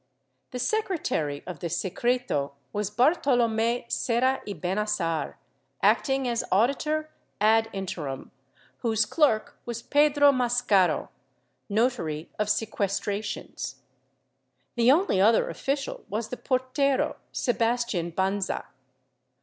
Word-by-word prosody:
The 250 Hz, -, -6 dB
secretary 250 Hz, -, -1 dB
of 180 Hz, -3 st, -7 dB
the 170 Hz, -, -3 dB
secreto 190 Hz, -, -1 dB, 0.2 s
was 205 Hz, -1 st, -1 dB
Bartolome 240 Hz, -2 st, +2 dB
Serra 260 Hz, +3 st, +1 dB
y 205 Hz, -, -3 dB
Bennassar, 185 Hz, -4 st, -1 dB, 0.5 s
acting 270 Hz, -2 st, +3 dB
as 235 Hz, -1 st, 0 dB
auditor 300 Hz, -, +1 dB, 0.3 s
ad 220 Hz, +2 st, +4 dB
interim, 165 Hz, -9 st, -5 dB, 0.5 s
whose 220 Hz, -3 st, +1 dB
clerk 225 Hz, -3 st, +1 dB
was 235 Hz, -1 st, -5 dB
Pedro 290 Hz, 0 st, +5 dB
Mascaro, 235 Hz, -, +2 dB, 0.6 s
notary 200 Hz, -9 st, -1 dB
of 210 Hz, -, +1 dB
sequestrations. 205 Hz, -1 st, -2 dB, 1.0 s
The 235 Hz, +1 st, +4 dB
only 290 Hz, -, +3 dB
other 220 Hz, +3 st, +4 dB
official 275 Hz, 0 st, -3 dB
was 215 Hz, +2 st, -3 dB
the 250 Hz, -, -5 dB
portero, 260 Hz, +1 st, 0 dB
Sebastian 230 Hz, -8 st, 0 dB
Banza. 190 Hz, +2 st, -1 dB
225 Hz, 100 wpm, -27 LUFS, 195-255 Hz, 1.0 s, Pedro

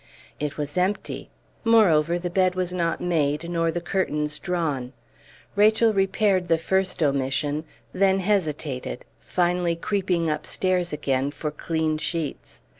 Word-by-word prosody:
It 150 Hz, -1 st, -3 dB
was 145 Hz, +2 st, -4 dB
empty; 190 Hz, +3 st, -2 dB, 0.3 s
moreover, 175 Hz, -8 st, +4 dB
the 175 Hz, 0 st, -4 dB
bed 185 Hz, 0 st, +2 dB
was 180 Hz, -1 st, -1 dB
not 170 Hz, -2 st, -1 dB
made, 160 Hz, -2 st, 0 dB
nor 165 Hz, -1 st, 0 dB
the 170 Hz, +1 st, -1 dB
curtains 150 Hz, -4 st, -1 dB
drawn. 150 Hz, -8 st, -2 dB, 0.6 s
Rachel 215 Hz, +2 st, +4 dB
repaired 195 Hz, -1 st, +2 dB
the 165 Hz, -1 st, +3 dB
first 190 Hz, +1 st, 0 dB
omission, 145 Hz, +2 st, 0 dB, 0.3 s
then 195 Hz, 0 st, +3 dB
hesitated, 155 Hz, -10 st, -1 dB
finally 175 Hz, -1 st, 0 dB
creeping 180 Hz, -2 st, 0 dB
upstairs 175 Hz, +4 st, 0 dB
again 140 Hz, -2 st, 0 dB
for 150 Hz, +1 st, -4 dB
clean 155 Hz, 0 st, -1 dB
sheets. 160 Hz, -2 st, -4 dB
170 Hz, 125 wpm, -25 LUFS, 150-185 Hz, 0.6 s, moreover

